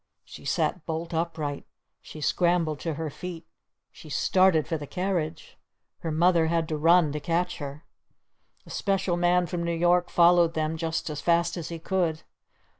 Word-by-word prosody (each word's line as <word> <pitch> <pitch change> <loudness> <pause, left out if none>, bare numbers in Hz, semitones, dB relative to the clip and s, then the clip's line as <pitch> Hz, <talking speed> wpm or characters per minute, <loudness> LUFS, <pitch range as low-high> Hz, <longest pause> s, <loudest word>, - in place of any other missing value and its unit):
_" - - -55 0.2
She - - -12
sat 180 - 0
bolt 165 +1 -4
upright! 160 -3 -2 0.4
She 155 - -11
scrambled 170 -2 +1
to 165 -3 -3
her 160 0 -4
feet! 170 +1 -7 0.5
She 155 - -13
started 185 +1 +3
for 165 - -1
the 145 -2 -6
carriage! 175 -3 -3 0.4
Her 165 - -4
Mother 165 +1 +3
had 165 0 0
to 155 - -1
run 165 0 +5
to 150 - -3
catch 170 +4 -1
her. 145 +1 -7 0.8
The - - -14
Special 195 -3 0
Man 175 +1 +2
from 170 +1 -4
New 170 0 -1
York 175 +1 +2
followed 170 -1 +4
them 155 0 -1
just 160 0 -3
as 150 -1 -5
fast 170 0 +2
as 170 -3 -5
he 170 - -5
could. 165 -2 -1
165 Hz, 175 wpm, -26 LUFS, 155-175 Hz, 0.8 s, run